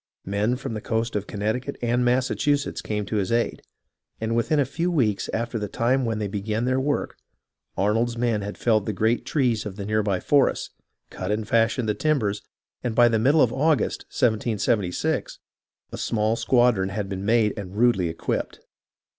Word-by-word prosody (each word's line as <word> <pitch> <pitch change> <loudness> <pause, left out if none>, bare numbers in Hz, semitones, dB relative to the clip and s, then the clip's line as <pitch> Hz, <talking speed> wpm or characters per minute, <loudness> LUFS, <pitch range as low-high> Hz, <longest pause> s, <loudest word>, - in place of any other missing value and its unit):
Men 105 +5 0
from 130 -1 -5
the 110 - -4
coast 115 +1 -2
of 105 0 -2
Connect 110 +4 -2
icut 140 - -5
and 120 +1 +1
Massachusetts 130 +3 +1
came 105 -1 -3
to 105 - -2
his 100 0 -1
aid, 115 0 0 0.6
and 110 +1 -1
within 130 +6 +1
a 140 - +3
few 165 +7 -2
weeks 120 - 0
after 115 0 -2
the 105 - -3
time 125 +5 +1
when 115 -1 -1
they 105 -1 -2
began 105 +3 -2
their 130 +1 +1
work, 145 +2 -1 0.6
Arnold's 115 +4 +1
men 115 -3 0
had 100 +1 -6
felled 110 -4 +1
the 110 - -1
great 110 +5 0
trees 125 -7 +1
of 105 -3 -6
the 100 - -6
near 110 +1 +1
by 100 -3 0
forests, 140 +6 +2 0.4
cut 95 - -5
and 105 0 -1
fashioned 115 +1 +2
the 105 - +2
timbers, 110 -8 0 0.4
and 120 -3 -2
by 120 0 +6
the 110 -1 +1
middle 140 +7 +4
of 120 -1 +1
August, 150 +2 +1
1776, 110 -5 0 0.5
a - - -6
small 110 0 0
squadron 120 -6 +2
had 100 0 -3
been 95 -1 -5
made 110 0 +3
and 100 -2 -7
rudely 105 -7 +3
equipped. 80 - -3
115 Hz, 185 wpm, -24 LUFS, 105-125 Hz, 0.6 s, by